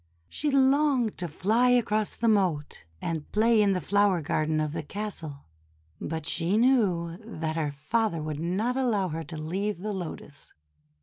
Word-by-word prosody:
She 300 - -1
longed 270 -3 +3
to 175 - -1
fly 220 +10 +2
across 220 -4 +1
the 230 - -1
moat 185 - +1 0.2
and 160 -3 -4
play 220 +1 +4
in 200 -1 +3
the 185 - 0
flower 200 0 +2
garden 155 +1 0
of 155 -1 -1
the 165 - -3
castle; 160 -5 -6 0.5
but 160 0 -4
she 170 +5 0
knew 195 -9 +2
that 160 -8 -4
her 155 -3 0
father 165 +6 -1
would 155 -1 -4
not 195 +9 -1
allow 225 -8 +1
her 165 +1 -4
to 160 +1 -8
leave 185 +6 -2
the 210 +1 -3
Lotus. 165 -5 -8
190 Hz, 165 wpm, -27 LUFS, 160-220 Hz, 0.5 s, play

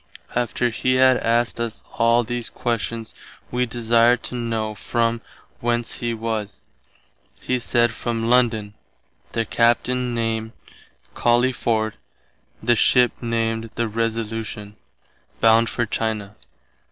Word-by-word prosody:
After 120 0 0
he 130 +3 +1
had 130 0 +5
asked 120 0 +1
us 115 -1 -4 0.2
all 115 +1 +4
these 120 0 -3
questions 115 -1 -3 0.4
wee 125 0 0
desired 115 0 +3
to - - -6
know 115 -2 -2
from 115 +2 -1 0.4
whence 120 0 -1
he 120 -1 -1
was. 110 -5 -3 0.8
He 125 0 -1
said 120 -1 +2
from 115 0 -3
London, 115 -4 +2 0.6
their 115 -1 0
Captain 120 +2 +1
name 115 -1 -2 0.6
Collyford, 120 -3 +1 0.7
the 120 +1 +4
ship 125 +2 +4
named 115 -1 -1
the 115 0 0
Resolution, 110 -2 -3 0.6
bound 115 0 +5
for 120 - -1
China. 110 -2 -3
115 Hz, 115 wpm, -22 LUFS, 115-120 Hz, 0.8 s, had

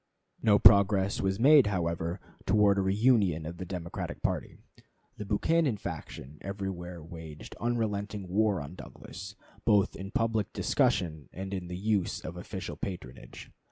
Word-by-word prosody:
No 105 -2 +5
progress 100 -1 +5
was 95 +1 0
made, 140 0 +7
however, 85 -2 -1 0.3
towards 100 0 +4
a - - +3
reunion 95 -5 +2
of 85 +2 -6
the 90 - -5
Democratic 85 -2 -5
party. - - -2 0.6
The 105 - -5
Buchanan 135 +5 +1
faction 75 -5 -7
everywhere 90 -4 -5
waged 80 -2 -10
unrelenting 105 -4 -2
war 100 +1 +2
on 70 - -8
Douglas, 95 +3 -10 0.3
both 105 -3 +3
in 95 +1 -7
public 110 -1 0
discussion 80 -4 0
and 95 +1 -6
in 90 -2 -4
the 90 0 -5
use 100 -1 0
of 85 - -7
official 95 +2 -6
patronage. 65 -10 -8
95 Hz, 140 wpm, -30 LUFS, 85-105 Hz, 0.6 s, made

